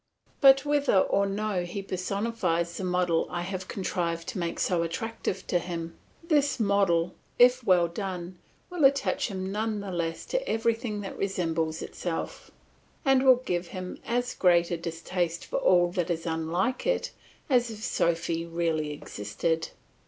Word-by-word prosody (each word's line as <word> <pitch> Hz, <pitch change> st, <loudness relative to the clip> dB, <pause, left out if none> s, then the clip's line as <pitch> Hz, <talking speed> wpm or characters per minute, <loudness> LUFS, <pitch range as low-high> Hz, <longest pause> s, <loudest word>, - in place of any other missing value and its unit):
But 275 Hz, 0 st, +7 dB
whether 290 Hz, -7 st, +2 dB
or 200 Hz, +1 st, +3 dB
no 200 Hz, -1 st, -1 dB
he 185 Hz, +3 st, -5 dB
personifies 185 Hz, -3 st, -1 dB
the -, -, -4 dB
model 180 Hz, -2 st, +1 dB
I 175 Hz, -, -3 dB
have 185 Hz, +1 st, -4 dB
contrived 170 Hz, -3 st, -2 dB
to 195 Hz, -, -4 dB
make 170 Hz, -1 st, -3 dB
so 175 Hz, -3 st, +1 dB
attractive 190 Hz, +6 st, -3 dB
to 175 Hz, -, +1 dB
him, 165 Hz, -1 st, -5 dB, 0.3 s
this 295 Hz, -5 st, +2 dB
model, 195 Hz, -5 st, +2 dB, 0.2 s
if 250 Hz, +1 st, +6 dB
well 180 Hz, -4 st, +4 dB
done, 180 Hz, 0 st, -5 dB, 0.3 s
will 350 Hz, -4 st, -1 dB
attach 275 Hz, 0 st, +3 dB
him 190 Hz, -3 st, -4 dB
none 215 Hz, +1 st, -1 dB
the 200 Hz, -1 st, -5 dB
less 165 Hz, -2 st, -3 dB
to -, -, 0 dB
everything 225 Hz, -1 st, 0 dB
that 195 Hz, -, -7 dB
resembles 165 Hz, -4 st, -1 dB
itself, 170 Hz, -2 st, -5 dB, 0.6 s
and 270 Hz, -1 st, +5 dB
will 255 Hz, -1 st, +6 dB
give 175 Hz, 0 st, -1 dB
him 185 Hz, +1 st, -6 dB
as 245 Hz, +2 st, -1 dB
great 175 Hz, -2 st, +3 dB
a 170 Hz, -, 0 dB
distaste 170 Hz, +1 st, -3 dB
for -, -, -3 dB
all 175 Hz, -1 st, +4 dB
that 175 Hz, -1 st, -1 dB
is 165 Hz, -1 st, -2 dB
unlike 170 Hz, -, -1 dB
it -, -, 0 dB, 0.4 s
as 245 Hz, -4 st, +3 dB
if 215 Hz, -1 st, -8 dB
Sophy 165 Hz, -2 st, 0 dB
really 165 Hz, -2 st, -1 dB
existed. 150 Hz, +5 st, -3 dB
185 Hz, 155 wpm, -28 LUFS, 170-220 Hz, 0.6 s, But